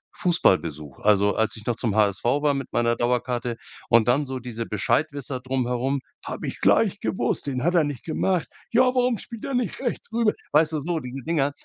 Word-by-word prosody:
Fußballbesuch. 80 - +1
Also, 100 -1 +3
als 110 -2 +1
ich 105 - -8
noch 120 - 0
zum 110 -3 -1
HSV 110 +7 +2
war 145 -1 +3
mit 135 -2 -4
meiner 120 0 +2
Dauerkarte 120 0 -1 0.3
und 115 -1 +5
dann 135 +4 +2
so 130 0 -4
diese 115 -2 -5
Bescheidwisser 140 +5 0
drumherum: 130 +1 -1 0.2
Habe - - -5
ich - - -5
gleich - - +3
gewusst, - - -1
den 130 -3 -2
hat 175 +3 +2
er 170 - +4
nicht 145 -4 -4
gemacht. 180 +2 0 0.2
Ja, 240 +2 +5
warum 250 -2 +2
spielt 230 +2 -8
er 275 -2 -2
nicht 245 -2 -1
rechts 240 -3 -3
rüber?" 230 -2 +2 0.2
Weißt 155 +1 +4
du - - 0
so, 165 +2 -1
diese 125 0 -6
Dinger, 150 -4 +1
130 Hz, 195 wpm, -24 LUFS, 120-165 Hz, 0.3 s, und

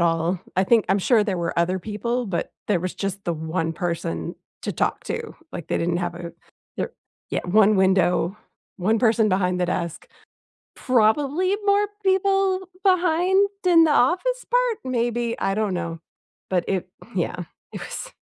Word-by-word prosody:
all. 170 +1 +1 0.2
I 190 - +3
think 225 0 +4
I'm 195 +2 +3
sure 215 +1 +3
there 195 -4 -1
were 170 0 -2
other 180 +2 +1
people, 230 +5 -2
but 190 -4 -3
there 195 -5 +1
was 185 +1 -3
just 195 0 -4
the 170 - 0
1 160 +1 -2
person 160 - -3 0.3
to - - -2
talk - - -1
to. - - -4 0.2
Like, - - -7
they - - 0
didn't 170 +1 0
have 175 -1 -2
a 170 -1 -7 0.4
there 475 - -3 0.4
yeah. - - 0
1 210 +3 +4
window, 190 0 +2 0.4
1 215 +4 +1
person 220 -1 +3
behind 180 -1 +1
the 180 - +2
desk. 170 -2 -3 0.7
Probably 280 - +2
more 405 +1 +4 0.2
people 385 -1 +2 0.2
behind 370 +2 +3 0.2
in 335 -2 +7
the 315 - +3
office 370 - +2
part, - - +2
maybe, 240 -2 -1
I 195 - 0
don't 210 -3 0
know. 170 -2 -4 0.5
But 180 -2 +1
it 185 -2 -1 0.3
yeah. 180 -1 -2 0.3
It - - -6
was - - -7
200 Hz, 165 wpm, -23 LUFS, -, 0.7 s, in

